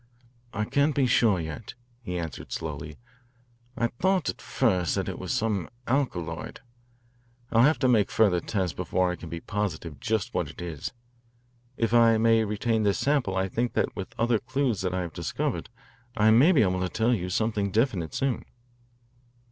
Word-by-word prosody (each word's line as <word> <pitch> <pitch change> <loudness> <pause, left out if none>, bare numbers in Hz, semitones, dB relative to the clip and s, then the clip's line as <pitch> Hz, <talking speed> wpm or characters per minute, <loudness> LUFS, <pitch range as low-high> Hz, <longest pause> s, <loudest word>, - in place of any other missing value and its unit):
"I 105 0 -2
can't 145 +5 +1
be 140 - +3
sure 115 -5 +3
yet," 80 +8 -6 0.3
he 90 -7 -4
answered 80 -5 -6
slowly. 75 0 -5 0.8
"I 115 - +1
thought 180 +9 +1
at - - -5
first 90 -3 +1
that - - -1
it - - -4
was - - -4
some 105 -6 0 0.2
alkaloid. 90 - -2 0.9
I'll 115 - +5
have 150 +6 +5
to 130 - +2
make 110 -5 +3
further 100 -6 +3
tests 95 -2 -2
before 90 0 0
I - - -3
can 85 - -10
be 85 +1 -5
positive 85 -8 -3
just 110 +6 -1
what 85 -5 -1
it 80 - -12
is. 85 -3 -5 0.9
If 115 0 0
I 115 -1 +6
may 115 0 +4
retain 110 +2 0
this 100 -2 +2
sample 130 -6 +1
I 95 0 +1
think 120 +5 -1
that - - 0
with 95 - -7
other 115 -1 +2
clues 130 -4 -1
that 90 -1 -1
I 95 - 0
have 85 -3 -5
discovered - - -3 0.5
I 110 0 +5
may 130 +11 +6
be 145 -11 +5
able 95 -2 +1
to 90 - -1
tell 115 +6 +1
you 90 -5 -2
something 105 +1 0
definite 100 - 0
soon." 135 -3 -1
105 Hz, 180 wpm, -27 LUFS, 90-120 Hz, 0.9 s, I